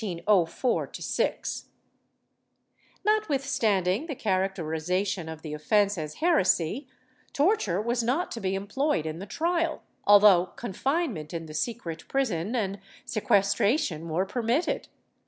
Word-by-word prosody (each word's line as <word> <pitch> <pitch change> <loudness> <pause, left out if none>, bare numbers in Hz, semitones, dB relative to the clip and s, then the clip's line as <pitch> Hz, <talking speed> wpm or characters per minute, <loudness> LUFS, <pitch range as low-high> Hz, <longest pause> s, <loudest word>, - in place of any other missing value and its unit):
^ 190 +3 0 1.4
Notwithstanding 270 - +1
tlie 290 -6 -5
characterization 185 -2 -1
of 160 0 -8
the 155 -2 -5
offence 200 +7 +2
as 155 -3 -5
heresy, 265 - +2 0.5
torture 285 - +2
was 235 +3 0
not 260 +10 0
to 230 - -5
be 190 0 0
employed 205 - -1
in 160 +1 -4
the 195 - -7
trial, 335 - -1 0.2
although 200 -3 +7
confinement 235 - -2
in 165 -1 -4
the 155 - -10
secret 165 -1 -4
prison 225 -6 -1
and 200 -4 -1 0.3
sequestration 200 - +1
were 175 +4 0
permitted. 240 - -1
200 Hz, 110 wpm, -27 LUFS, 175-255 Hz, 1.4 s, although